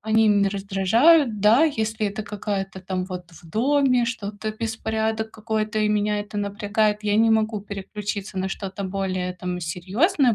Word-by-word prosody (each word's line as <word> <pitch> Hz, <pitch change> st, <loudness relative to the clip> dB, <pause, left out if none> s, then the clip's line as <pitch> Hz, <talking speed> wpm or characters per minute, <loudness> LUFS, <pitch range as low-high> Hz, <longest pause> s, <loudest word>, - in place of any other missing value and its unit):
они 220 Hz, +1 st, +3 dB
меня 200 Hz, -1 st, +4 dB
раздражают. 210 Hz, -, +3 dB
Да, 225 Hz, +9 st, +6 dB
если 220 Hz, -7 st, -1 dB
это 205 Hz, +2 st, -4 dB
какая-то 200 Hz, -2 st, -4 dB
там, 185 Hz, 0 st, -3 dB
вот, 180 Hz, -2 st, -8 dB
в 165 Hz, -, -16 dB
доме, 255 Hz, -, +3 dB
что-то, 215 Hz, -2 st, -4 dB
беспорядок 220 Hz, 0 st, -2 dB
какой-то, 215 Hz, 0 st, -2 dB
и 210 Hz, -, +2 dB
меня 210 Hz, 0 st, +1 dB
это 205 Hz, 0 st, -8 dB
напрягает, 205 Hz, +1 st, 0 dB
я 205 Hz, 0 st, +1 dB
не 225 Hz, +1 st, +4 dB
могу 220 Hz, -1 st, +1 dB
переключиться 200 Hz, 0 st, -5 dB
на 190 Hz, +1 st, -1 dB
что-то 195 Hz, 0 st, -5 dB
более 185 Hz, -1 st, -2 dB
там 180 Hz, 0 st, -4 dB
серьёзное, 215 Hz, -, +1 dB
210 Hz, 155 wpm, -24 LUFS, 195-220 Hz, -, Да